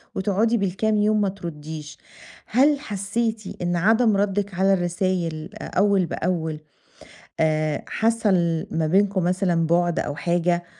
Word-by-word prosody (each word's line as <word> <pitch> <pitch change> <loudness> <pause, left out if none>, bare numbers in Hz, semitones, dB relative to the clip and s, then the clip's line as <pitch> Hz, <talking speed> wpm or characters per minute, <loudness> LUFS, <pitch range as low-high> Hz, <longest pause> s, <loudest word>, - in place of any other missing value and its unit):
وتقعدي 210 +4 +1
بالكام 205 +2 0
يوم 210 0 +2
ما 200 - +1
ترُدّيش، 155 -5 -8 0.5
هل 280 +5 +3
حسّيتِ 220 -1 -2 0.2
إن 175 0 0
عدم 220 +4 +3
ردِّك 200 0 -1
على 190 +2 +3
الرسايل 175 -3 -1
أ - - -7
أوّل 200 -1 +2
بأوّل 165 -3 -2 0.8
آآ 155 -1 +1
حصل 195 -8 +1
ما 160 -1 0
بينكم 195 +2 +2
مثلًا 180 -2 +1
بُعد 175 +1 +1
أو 145 - -3
حاجة؟ 175 +3 0
185 Hz, 130 wpm, -23 LUFS, 170-205 Hz, 0.8 s, هل